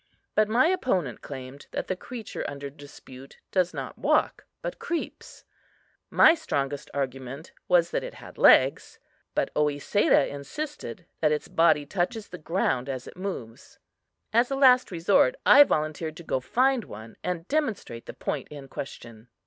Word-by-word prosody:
But 215 0 +3
my 240 +6 +4
opponent 245 - 0
claimed 135 0 -9
that - - -2
the 185 - -1
creature 230 +3 -7
under 140 -1 -7
dispute 135 -2 -13
does 180 -2 +2
not - - -7
walk, - - +1 0.2
but - - -5
creeps. 340 -2 -5 0.7
My 320 - +7
strongest 145 - -3
argument 135 +2 -5 0.2
was 170 -1 +3
that - - -1
it - - -7
had - - -13
legs; - - +5 0.4
but - - 0
Oesedah 150 +3 +2
insisted 180 - -6
that 155 -2 +3
its 150 - -1
body 160 -3 +3
touches 195 - -2
the 180 - -9
ground 150 -6 -1
as 130 -2 -4
it - - -11
moves. 180 - -7 0.6
As 235 +2 +4
a 275 - -1
last 255 -2 +5
resort, 190 - +3
I 290 - +9
volunteered 155 - -2
to 170 - -10
go 130 - -1
find 255 - +1
one, 110 +2 -10
and 180 -1 -3
demonstrate 225 - -2
the - - -8
point - - -3
in 140 -2 -10
question. 115 -4 -8
165 Hz, 155 wpm, -26 LUFS, 140-215 Hz, 0.7 s, I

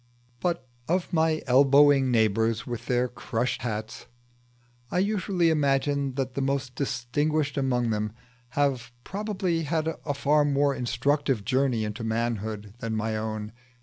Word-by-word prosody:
But 170 -5 -1 0.2
of 180 +2 0
my 160 -1 +2
elbowing 140 +1 +5
neighbours 110 -1 +2
with 120 -2 -6
their 125 0 +2
crush 125 0 -2
hats, 110 -1 -5 0.8
I - - -2
usually 190 -3 +2
imagine 140 -2 +1
that 135 -2 -2
the 140 - -2
most 135 -1 -1
distinguished 140 +3 -1
among 125 -4 +1
them 105 0 -1 0.5
have 130 -4 +1
probably 195 -4 -2
had 160 +1 -1
a 145 -2 -2
far 145 +2 +3
more 145 -1 +2
instructive 135 -2 0
journey 130 -3 +1
into 105 +2 -5
manhood 110 -2 -2
than 115 -2 -3
mine. 110 -1 -2
135 Hz, 130 wpm, -27 LUFS, 115-145 Hz, 0.8 s, elbowing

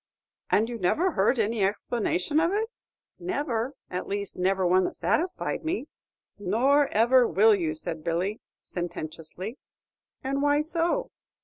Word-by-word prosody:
"And 220 +2 +3
you 235 -1 -5
never 325 - +2
heard 210 +1 +2
any 220 -1 +1
explanation 205 - 0
of 335 +2 +2
it?" 440 +3 -1 0.5
"Never; 285 -8 -2 0.2
at 180 0 -3
least, 200 -1 -3
never 190 +1 +1
one 185 +1 +4
that - - -3
satisfied 355 +1 -1
me." 320 -1 -2 0.5
"Nor 260 +9 +3
ever 240 +1 +4
will 215 +3 +5
you," 165 -6 0
said 160 0 -4
Billy, 175 +6 -1 0.2
sententiously. 175 - -5 0.6
"And 275 +1 -1
why 290 +1 +3
so?" 335 +9 -1
225 Hz, 135 wpm, -27 LUFS, 185-290 Hz, 0.6 s, will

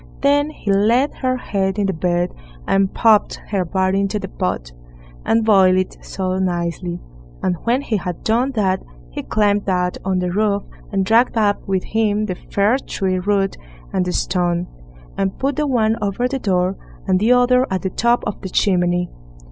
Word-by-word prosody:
Then 290 +1 +3
he 215 -9 -3
laid 230 +8 +3
her 255 -1 0
head 195 -5 -1
in 205 - +1
the 195 - 0
bed, 175 +1 0 0.3
and 195 -1 +2
popped 220 -3 +3
her 195 -3 0
body 190 +2 0
into 200 +1 0
the - - -5
pot, - - -3 0.6
and 225 0 +3
boiled 190 -4 +5
it 185 0 -2
so 185 -1 -3
nicely; 175 -1 -2 0.4
and 185 -1 +1
when 245 +4 +1
he 220 - 0
had 180 -2 -5
done 235 +4 +2
that, 190 -5 +1 0.3
he - - -4
climbed 205 -1 +1
up 180 -1 0
on 190 -1 0
the 180 -1 -1
roof, 205 +1 +1 0.3
and 195 -2 0
dragged 230 +3 +3
up 205 -2 +2
with 190 -1 0
him 215 -1 0
the 190 - -2
fir 200 +6 +1
tree 190 -7 -2
root 195 +1 0 0.4
and 190 - +1
the 180 - -1
stone, 175 -1 0 0.5
and 195 -1 -1
put 275 +1 -1
the 300 -1 0
one 225 -4 +2
over 205 +4 0
the 270 +1 -3
door, 185 -3 +1 0.3
and 185 -1 +2
the 220 +5 +3
other 250 +1 +4
at 190 -1 -2
the 190 - -2
top 235 +4 +2
of 210 - -4
the 190 - -5
chimney. 180 -2 +1
195 Hz, 185 wpm, -20 LUFS, 185-220 Hz, 0.6 s, boiled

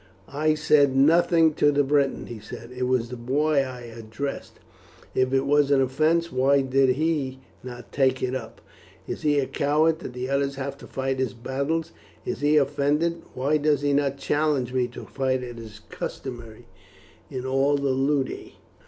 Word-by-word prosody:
"I 155 +2 +2
said 145 -3 +3
nothing 165 +3 +4
to 145 0 +3
the 145 0 +2
Briton," 140 0 +1
he 120 -2 -8
said; 115 +3 -10
"it 125 0 -2
was 125 -2 0
the 125 - -6
boy 140 +5 +1
I 130 -2 -7
addressed. 115 +3 -6 0.6
If 130 0 +1
it 135 0 +2
was 145 0 +3
an 140 -1 +4
offence, 155 +6 +1
why 135 +2 +3
did 135 -1 +2
he 145 -4 -1 0.2
not 125 -1 -9
take 130 -2 +1
it 130 0 -1
up? 130 -4 -6 0.5
Is - - -5
he 150 -1 +2
a 140 - +2
coward 155 +4 +1
that 125 -7 -8
others 140 0 0
have 135 0 -4
to - - -11
fight 135 0 -2
his 130 -1 -1
battles? 140 +7 -2 0.3
If - - -4
he 145 +1 +3
is 150 - +6
offended, 150 +4 0
why 140 +4 +1
does 150 -1 +1
he 145 0 +1
not 140 -1 +1
challenge 145 -4 0
me 125 -1 +1
to 120 - -10
fight, 130 -1 -1
as 120 -1 -8
is 110 -2 -11
customary 120 -4 -7 0.6
in 130 -1 -5
all 135 +2 +2
the 140 -1 0
ludi?" 135 +1 -1
135 Hz, 180 wpm, -25 LUFS, 130-145 Hz, 0.6 s, is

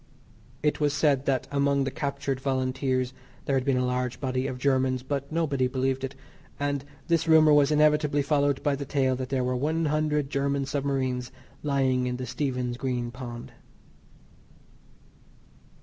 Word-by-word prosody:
It 150 - +1
was 145 -1 +1
said 140 -3 +2
that 130 -2 +1
among 140 0 +2
the 135 - -2
captured 140 -2 -3
Volunteers 130 -1 -1 0.3
there 140 - 0
had 130 - +1
been 135 -1 +1
a 125 - +1
large 125 -1 -2
body 130 -1 -1
of 130 -2 -4
Germans, 130 -1 +1
but 140 +1 -3
nobody 145 -6 +1
believed 130 +1 -1
it; 135 +1 -4 0.4
and 145 -1 -1 0.2
this 165 -1 +1
rumour 155 -1 +6
was 145 -1 +5
inevitably 150 -1 +3
followed 145 -1 +1
by 145 -2 +2
the 140 - -5
tale 135 -2 +1
that 130 0 -5
there 130 -2 0
were 125 0 0
one 155 +5 0
hundred 150 -2 0
German 140 0 0
submarines 135 -3 -1 0.3
lying 130 -3 +1
in 125 0 -2
the 130 - -4
Stephen's 125 -1 -2
Green 125 -2 -2
pond. 120 -1 -8
135 Hz, 160 wpm, -27 LUFS, 130-145 Hz, 0.4 s, rumour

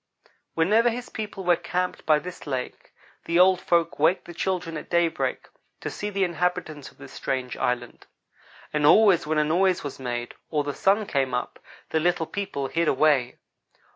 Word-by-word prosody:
Whenever 215 +9 +4
his 240 +1 -5
people 210 -3 -6
were 175 -1 +4
camped 180 +1 -3
by 155 -1 +5
this 175 +1 -8
lake 130 -3 -5 0.3
the 170 - +1
old 185 0 +5
folks 170 -3 +1
waked 160 +5 +2
the 175 - -9
children 175 -1 -2
at 155 - -7
daybreak 170 -1 0 0.3
to - - -5
see 205 - -4
the 200 -1 0
inhabitants 170 -4 -2
of - - -24
this - - -12
strange 130 -2 -3
island; 120 -1 -3 0.7
and 150 -1 0
always 190 -4 +5
when 155 0 0
a 150 - +4
noise 180 +4 +2
was 145 -2 -6
made, 120 -2 -4 0.2
or 150 -2 0
the 145 0 -3
sun 205 +7 +2
came 135 -7 0
up, 125 - -4 0.3
the 160 - +2
little 170 0 +1
people 165 -5 -4
hid 165 +4 0
away. 135 -4 +2
165 Hz, 175 wpm, -25 LUFS, 145-185 Hz, 0.7 s, by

